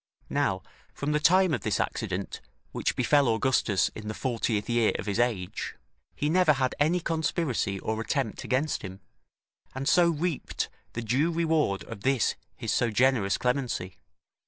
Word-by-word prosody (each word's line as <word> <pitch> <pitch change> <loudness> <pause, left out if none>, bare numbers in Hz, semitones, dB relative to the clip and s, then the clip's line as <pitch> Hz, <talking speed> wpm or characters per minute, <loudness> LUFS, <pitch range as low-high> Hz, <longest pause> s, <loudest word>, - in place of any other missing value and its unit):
Now, 95 -1 0 0.3
from 145 +1 -2
the 150 - +2
time 185 +2 +4
of - - -1
this 105 -4 0
accident - - -3 0.3
which - - -1
befell 140 +2 +3
Augustus 115 -3 +2
in 110 -1 -9
the 110 - -4
fortieth 115 -4 -1
year 120 -2 +2
of - - -5
his 105 +1 -1
age, 110 -7 -1 0.4
he 145 - -1
never 170 0 +4
had 130 -2 0
any 160 +5 +3
conspiracy 160 - -1
or 110 +2 -2
attempt 120 -1 -2
against 135 +4 0
him, 95 0 -8 0.7
and 135 +1 -3
so 175 -1 +5
reaped 165 -1 -2 0.2
the 115 - -4
due 130 +9 +2
reward 160 -11 +1
of 100 - -9
this 130 +1 +2 0.2
his - - -2
so 120 - +2
generous 110 -3 +2
clemency. 125 -8 -1
130 Hz, 160 wpm, -28 LUFS, 110-150 Hz, 0.7 s, so